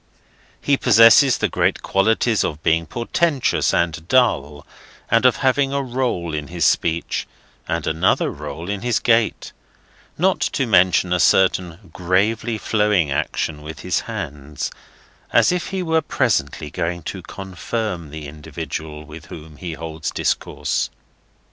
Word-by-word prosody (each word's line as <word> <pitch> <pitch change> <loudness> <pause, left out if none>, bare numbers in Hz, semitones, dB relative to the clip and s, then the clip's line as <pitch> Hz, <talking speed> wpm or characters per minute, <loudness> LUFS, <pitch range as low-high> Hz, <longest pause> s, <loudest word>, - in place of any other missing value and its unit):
He 140 -1 +2
possesses 115 +3 +6
the - - +1
great - - 0
qualities 110 +2 +2
of 75 +1 -4
being 80 0 +2
portentous 140 - 0
and 85 -1 -1
dull, 75 - +1 0.5
and 115 +2 +5
of 125 - +3
having 135 +1 +2
a 140 0 0
roll 120 -10 -2
in 75 -1 -3
his 85 -1 -1
speech, 85 0 0 0.4
and 80 -1 -2
another 80 +4 +1
roll 75 +3 -7
in 100 0 -3
his 120 -1 +1
gait; 115 -2 +1 0.7
not 185 +3 +2
to 135 - 0
mention 90 -4 +3
a 90 - +1
certain 90 -1 +2
gravely 105 +6 0
flowing 105 -8 +1
action 75 +2 -2
with 75 +1 -9
his 90 -4 0
hands, 70 0 -5 0.6
as - - +4
if 180 -1 -2
he 190 -1 -3
were 160 -1 +2
presently - - -1
going 85 0 -3
to - - -6
Confirm 95 -2 -5
the 75 0 -8
individual 75 +1 -7
with 80 +1 -11
whom 75 -1 -11
he 85 0 -6
holds 80 -1 -5
discourse. - - -1
90 Hz, 140 wpm, -21 LUFS, 80-115 Hz, 0.7 s, possesses